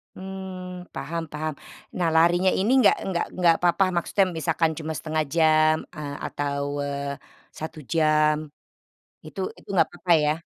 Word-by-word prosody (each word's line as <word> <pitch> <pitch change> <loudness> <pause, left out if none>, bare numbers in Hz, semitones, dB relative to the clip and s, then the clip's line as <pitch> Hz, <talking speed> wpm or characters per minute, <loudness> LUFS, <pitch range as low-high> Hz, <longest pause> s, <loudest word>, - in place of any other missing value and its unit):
Mmm, 185 -1 -8
paham-paham. 155 -2 -4 0.4
Nah, 175 -2 +1
larinya 175 +3 +4
ini 205 +6 +2
enggak - - +5
enggak 185 -3 -1
enggak 175 -2 +4
papa 175 +2 +4
maksudnya 190 +3 +2
misalkan 165 0 +1
cuma 160 0 -4
0.5 155 +2 -1
jam 155 -1 +5 0.2
eee, 145 -2 -5
atau, 140 -1 -2 0.2
eee, 140 0 -3 0.4
1 160 0 -6
jam, 155 -1 +4 0.9
itu 175 - -9 0.2
itu - - -22
enggak 165 -3 +4
papa 175 0 -3
ya? 150 - +3
165 Hz, 140 wpm, -25 LUFS, 155-180 Hz, 0.9 s, enggak